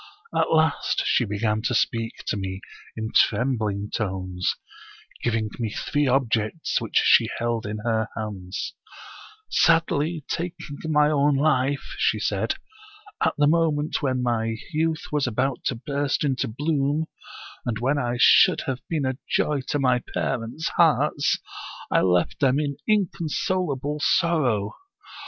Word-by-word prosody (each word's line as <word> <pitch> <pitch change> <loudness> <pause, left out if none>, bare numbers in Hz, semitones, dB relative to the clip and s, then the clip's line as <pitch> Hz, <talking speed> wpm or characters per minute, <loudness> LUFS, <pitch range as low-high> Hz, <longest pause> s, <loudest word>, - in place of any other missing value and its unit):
At - - +1
last 160 -1 +2
she 120 - +2
began 105 +1 -1
to 125 - 0
speak 115 0 -1
to - - -1
me 95 -1 -4 0.4
in 110 0 -3
trembling 105 -4 +1
tones, 95 -3 -2 0.7
giving 110 -2 0
me 115 -2 -1
three 145 +6 -1
objects 125 +1 0
which - - -2
she - - +5
held 115 -1 -2
in 105 +1 -4
her 110 -1 +1
hands: 100 -4 -5 0.4
* 435 0 -18
Sadly 160 -1 +2
taking 175 +1 -4 0.2
my 150 -1 +3
own 145 -1 +3
life,* 140 -1 +1
she - - +2
said, - - -1 0.3
' 420 -1 -10
at - - +2
the 145 - +4
moment 155 -1 +1
when 130 -3 0
my 115 -2 0 0.2
youth 160 0 0
was 150 -3 +1
about 130 +2 -1
to 125 - 0
burst 140 +4 -1
into 135 -2 0
bloom, 145 +4 0 0.6
and 120 -3 -2
when 135 +6 +1
I 120 -2 -1
should - - +6
have 130 -1 -3
been 155 -5 0
a 130 0 -2
joy 150 -2 +1
to - - 0
my 125 -3 +2
parents' 125 +6 -2
hearts, 150 -3 +3 0.5
I - - +4
left 90 -1 +1
them 135 0 +3
in 140 -2 -2
inconsolable 165 -6 0
sor 170 +1 +2
row. 105 -6 0
135 Hz, 145 wpm, -24 LUFS, 115-150 Hz, 0.7 s, should